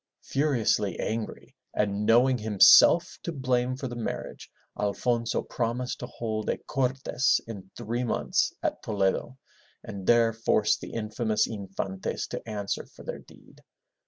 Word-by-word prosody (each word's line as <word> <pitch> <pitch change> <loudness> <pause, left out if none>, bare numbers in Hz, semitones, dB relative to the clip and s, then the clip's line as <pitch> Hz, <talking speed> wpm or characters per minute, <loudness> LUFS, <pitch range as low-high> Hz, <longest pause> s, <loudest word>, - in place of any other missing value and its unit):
Furiously 120 - +1
angry, 110 0 -4 0.2
and 105 0 0
knowing 125 +2 +5
himself 110 - +6
to 170 - -4
blame 130 -3 0
for 135 - -4
the 120 - -6
marriage, 120 - -5 0.3
Alfonso 115 +3 0
promised 125 +1 -3
to 120 - -5
hold 110 -3 -4
a - - 0
Cor'tesi 130 -1 0
in 100 -5 -9
three 120 +1 -2
months 120 - +1
at - - -1
Toledo, 100 +4 -1 0.5
and 95 -2 -8
there 115 -1 +5
force 110 -1 +2
the - - -9
infamous 110 -1 0
Infantes 95 -2 -4
to - - -4
answer 100 -2 -3
for - - -15
their - - -5
deed. - - -18
115 Hz, 135 wpm, -27 LUFS, 105-125 Hz, 0.5 s, himself